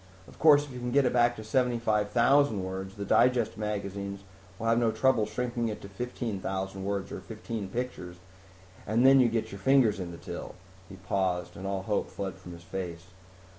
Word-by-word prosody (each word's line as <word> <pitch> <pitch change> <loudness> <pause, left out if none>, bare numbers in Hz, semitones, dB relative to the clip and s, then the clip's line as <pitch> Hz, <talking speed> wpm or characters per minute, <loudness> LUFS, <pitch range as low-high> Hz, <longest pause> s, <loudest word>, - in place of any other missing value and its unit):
Of - - -16
course 145 -2 +7
if 140 - -11
you 125 - -6
can 125 0 -3
get 140 +2 +3
it - - +1
back 120 0 +4
to 110 - -8
75,000 115 0 +2
words 95 +1 -5
the 100 -1 -5
digest 120 +2 +3
magazines 100 -2 -4 0.3
will 115 - -5
have 115 +1 +3
no 115 -1 +3
trouble 110 0 +2
shrinking 120 +1 -2
it 105 - -5
to 100 - -8
15,000 95 -4 -4
words 100 0 -3
or - - -5
fifteen 110 -4 -6
pictures, 105 -5 -5 0.7
and 110 +3 +2
you - - +7
then 135 -3 +6
get 115 -1 -2
your 100 - -8
fingers 120 -2 +4
in 90 -2 -4
the 85 - -8
till." - - -7 0.3
He 95 - -9
paused 90 -1 -2
and 95 0 -6
all 95 -1 -2
hope 105 +1 -1
fled 95 -2 -4
from 90 - -11
his 85 0 -12
face. 85 -1 -6
105 Hz, 195 wpm, -29 LUFS, 95-120 Hz, 0.7 s, course